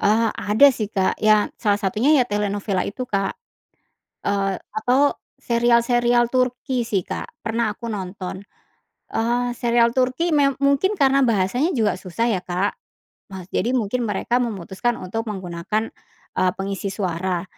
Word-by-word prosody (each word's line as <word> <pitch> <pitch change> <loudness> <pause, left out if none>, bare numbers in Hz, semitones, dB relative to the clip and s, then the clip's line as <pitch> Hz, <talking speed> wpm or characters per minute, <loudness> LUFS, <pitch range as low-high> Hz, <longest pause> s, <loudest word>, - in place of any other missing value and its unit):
Eee, 225 +2 +3
ada 220 +8 +5
sih 215 -5 -3
Kak, 190 -2 +1
ya 215 -1 +4
salah 205 -1 +1
satunya 215 +9 +2
ya - - +3
telenovela 205 -1 -1
itu, 250 +5 -5
Kak, 195 -1 0 0.9
eee, 195 -1 +1 0.2
atau 285 - +2 0.2
serial-serial 240 0 +3
Turki 255 0 0
sih, 205 -5 -1
Kak, 190 - -5
pernah 225 -1 0
aku 235 - -8
nonton, 190 -2 -5 0.7
eee, 240 +1 0
serial 235 0 +2
Turki 255 +7 +1
me 275 -1 +4
mungkin 280 +8 +3
karena 275 0 +4
bahasanya 235 - +1
juga 220 - +1
susah 185 +5 -2
ya, 200 -6 0
Kak. 180 +3 -1 0.6
Nah, 190 -2 -7
jadi 240 - 0
mungkin 240 +1 -1
mereka 210 +4 0
memutuskan 225 +1 -2
untuk 225 +5 -4
menggunakan, 190 +2 -3 0.5
eee, 185 - +3
pengisi 195 +1 -3
suara. 185 -2 -2
220 Hz, 140 wpm, -22 LUFS, 195-245 Hz, 0.9 s, ada